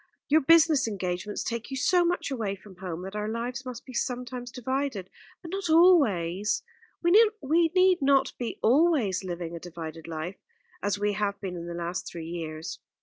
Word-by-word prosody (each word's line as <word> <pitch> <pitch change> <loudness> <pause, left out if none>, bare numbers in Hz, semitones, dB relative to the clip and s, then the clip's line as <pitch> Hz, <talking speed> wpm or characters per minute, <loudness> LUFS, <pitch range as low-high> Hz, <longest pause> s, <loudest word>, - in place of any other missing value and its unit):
Your 310 +2 +5
business 315 -2 +5
engagements 190 -1 -3
take 235 -1 -4
you 270 - -4
so 360 +6 +3
much 345 -4 -1
away 215 -7 -2
from 190 -1 -16
home, 180 -2 -5
that 195 +2 -7
our 210 0 -2
lives 245 +4 -4
must 245 -1 -7
be 255 - -10
sometimes 250 0 -3
divided; 260 -6 -3 0.3
but 335 - -8
not 385 -3 -3
always 215 - +4 0.4
we 345 - +3 0.6
need 370 -1 +4
not 275 0 +3
be 240 -2 -3
always 255 - +3
living 175 -2 -5
a - - -6
divided 165 -2 -8
life, 165 +3 -5 0.4
as 205 0 0
we 205 0 0
have 200 -1 -1
been 190 -2 -5
in 170 0 -6
the 170 - -5
last 175 +1 -4
three 165 -2 -7
years." 160 -2 -5
210 Hz, 175 wpm, -27 LUFS, 180-275 Hz, 0.6 s, Your